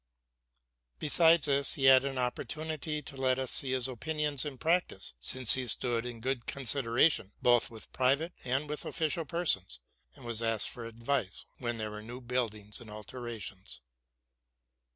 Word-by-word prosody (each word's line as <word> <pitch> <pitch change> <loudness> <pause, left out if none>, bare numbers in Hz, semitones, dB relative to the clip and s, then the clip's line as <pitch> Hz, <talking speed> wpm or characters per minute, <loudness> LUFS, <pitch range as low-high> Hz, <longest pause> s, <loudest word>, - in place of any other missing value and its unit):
Besides 165 +1 +5
this, 140 -1 +2
he 135 - -1
had 130 0 +7
an 135 -1 -3
opportunity 150 +4 -3
to 140 +1 -10
let 130 -1 +1
us 130 -1 -1
see 135 - +1
his 130 -1 +1
opinions 150 +2 -1
in 140 -3 -6
practice; 170 +6 -1
since 120 - +6
he 130 -1 0
stood 120 +1 +1
in 120 -2 -8
good 130 -1 -3
consideration, 130 - +1
both 120 -1 +3
with 110 -2 -9
private 140 +7 +1
and 130 +4 -1
with 150 0 -4
official 160 +1 -2
persons, 135 - 0 0.4
and.was 115 -1 -4
asked 115 -2 +1
for 120 -3 -9
advice 115 -2 -3
when 120 -2 -3
there 110 -1 -4
were 105 0 -7
new 120 +3 -9
buildings 115 -4 -3
and 115 - -11
alterations. 105 - -7
130 Hz, 150 wpm, -30 LUFS, 115-145 Hz, 0.4 s, had